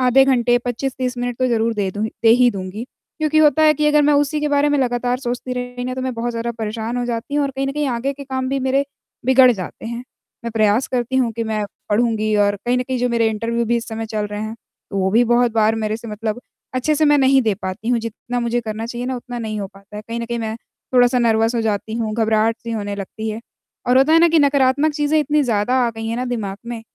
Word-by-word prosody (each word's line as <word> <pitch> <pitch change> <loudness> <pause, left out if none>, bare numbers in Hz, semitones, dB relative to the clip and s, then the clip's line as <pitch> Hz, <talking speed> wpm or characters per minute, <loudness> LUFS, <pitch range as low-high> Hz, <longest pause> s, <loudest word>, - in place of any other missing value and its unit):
आधे 255 +1 +5
घंटे 245 -2 +3
25-30 250 +1 -3
मिनट 245 -1 -2
तो 255 - +2
ज़रूर 230 -1 +1
दे 200 -2 -1
दूँगी 210 +3 -3
दे 225 - +5
ही 245 +1 +5
दूँगी। 195 +2 -6 0.3
क्योंकि 310 0 +1
होता 310 0 +5
है 310 - +6
कि 300 +1 0
अगर 300 0 +4
मैं 295 +1 +4
उसी 290 +1 +1
के 300 - 0
बारे 290 0 +2
में 290 -1 +2
लगातार 245 -1 0
सोचती 250 0 -4
रही 245 0 -4
ना 255 0 -3
तो 260 - -4
मैं 260 -1 -2
बहुत 235 +1 -2
ज़्यादा 230 0 -3
परेशान 220 +2 -3
हो 245 - -1
जाती 240 +4 -4
हूँ 295 - +2
और 275 - -2
कहीं 270 0 -3
न 275 - -2
कहीं 295 0 -1
आगे 250 +3 -1
के 280 0 -10
काम 260 -1 -3
भी 275 - 0
मेरे 265 +2 +1 0.4
बिगड़ 260 -1 +7
जाते 190 +1 -7
हैं। 235 +1 -4 0.5
मैं 235 - -2
प्रयास 215 +2 +2
करती 255 +1 -1
हूँ 245 -3 +2
कि 230 +1 -3
मैं 215 -1 -1 0.2
पढ़ूँगी 215 -1 +1
और 205 0 +1
कहीं 245 +1 +2
न 250 - 0
कहीं 255 0 -3
जो 250 - +1
मेरे 230 -2 +2
इंटरव्यू 230 +2 -1
भी 235 +1 +1
इस 235 - -4
समय 225 0 -4
चल 215 -1 -2
रहे 205 0 -5
हैं 220 +1 -5 0.4
तो 195 - -2
वो 190 0 +1
भी 235 +4 +4
बहुत 240 0 +2
बार 220 0 +3
मेरे 215 -1 -2
से 230 0 -10
मतलब 215 +2 -4 0.3
अच्छे 280 +4 +1
से 310 - +2
मैं 295 0 +5
नहीं 270 0 +5
दे 220 -4 +1
पाती 195 +3 -6
हूँ, 245 -1 +3
जितना 230 +2 -5
मुझे 235 0 0
करना 220 0 -5
चाहिए 240 +1 -5
ना 260 -1 -2
उतना 245 0 -7
नहीं 215 -2 -4
हो 195 - -3
पाता 200 +1 -13
है। 210 - -6
कहीं 230 +1 -3
न - - -3
कहीं 235 0 -3
मैं 220 0 -3 0.4
थोड़ा-सा 245 0 +5
नर्वस 225 0 +2
हो 230 - +1
जाती 220 0 -2
हूँ, 225 -2 -2
घबराहट 225 0 +2
सी 230 - -6
होने 205 -2 -3
लगती 220 +3 -5
है 220 +2 -5 0.5
और 255 +1 +5
होता 285 +4 +4
है 330 - +7
ना 340 - +6
कि 330 -1 +3
नकारात्मक 285 +1 +3
चीज़ें 295 +1 +1
इतनी 300 +1 +2
ज़्यादा 235 -1 +1
आ 235 - 0
गई 225 0 -6
हैं 230 - -2
ना 250 - -2
दिमाग 220 -6 -3
में 235 -1 -5
240 Hz, 265 wpm, -20 LUFS, 220-260 Hz, 0.5 s, बिगड़